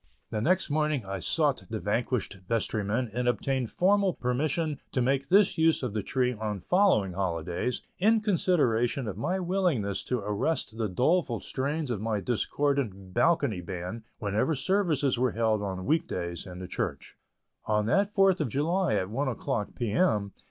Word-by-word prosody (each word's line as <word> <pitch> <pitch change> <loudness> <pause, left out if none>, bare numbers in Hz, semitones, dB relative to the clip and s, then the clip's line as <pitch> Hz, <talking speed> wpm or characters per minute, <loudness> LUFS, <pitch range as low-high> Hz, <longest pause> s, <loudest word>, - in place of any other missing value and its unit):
The 110 - -1
next 180 - +2
morning 150 -5 0
I 95 0 -4
sought 145 - +1
the 110 - -3
vanquished 105 -1 -1
vestrymen 110 +1 -1
and 125 +1 -1
obtained 125 +1 0
formal 195 0 +2
permission 145 +4 -1
to - - +1
make 135 +2 +1
this 190 -2 +4
use 160 -3 +3
of 120 -5 -2
the 110 - -1
tree 125 +3 0
on 105 -2 -3
following 175 - +3
holidays, 90 +4 -2 0.2
in 220 +4 +4
consideration 145 - +1
of 100 - -4
my 180 - -1
willingness 175 - 0
to 125 - 0
arrest 105 +5 -1
the 110 -2 -1
doleful 130 - +1
strains 145 +1 -2
of 105 -4 -2
my 110 -1 -1
discordant 120 -4 -1
balcony 140 - +2
band 90 +4 -5 0.2
whenever 110 +9 0
services 150 -6 +1
were 125 -2 +1
held 110 -2 +1
on 95 -2 -4
week 165 +2 +1
days 85 +1 -4
in 90 -1 -8
the 90 0 -6
church. - - -4 0.5
On 105 -1 +1
that 195 - +2
Fourth 195 -3 +3
of 145 - -1
July, 165 - +1
at 95 -2 0
one 135 +5 -1
o'clock, 125 -3 -2
P. 120 -4 -2
M. 105 - +2
125 Hz, 165 wpm, -28 LUFS, 105-160 Hz, 0.5 s, this